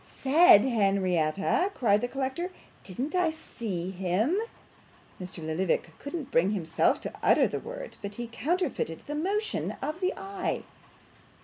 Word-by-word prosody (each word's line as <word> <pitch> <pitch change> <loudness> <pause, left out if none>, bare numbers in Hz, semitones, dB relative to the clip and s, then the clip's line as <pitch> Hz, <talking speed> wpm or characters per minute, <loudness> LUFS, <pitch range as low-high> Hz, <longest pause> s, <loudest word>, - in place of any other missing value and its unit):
'Said, 275 - +6
Henrietta!' 195 - +2
cried 210 -4 +3
the 245 - 0
collector. 270 +7 -3 0.3
'Didn't 250 - -4
I 360 -2 +3
see 205 - -5
him 190 - +1 0.4
' - - -22
Mr 180 -3 -7
Lillyvick 165 +1 0
couldn't 285 -1 -6
bring 185 +5 +3
himself 170 -5 +1
to - - -6
utter - - +5
the - - -3
word, - - -8
but 205 0 -6
he 240 - -4
counterfeited 285 - -2
the 295 - -5
motion 395 +8 -1
of 310 +3 -4
the 370 - +1
eye. 390 -1 -3
240 Hz, 140 wpm, -28 LUFS, -, 0.4 s, Said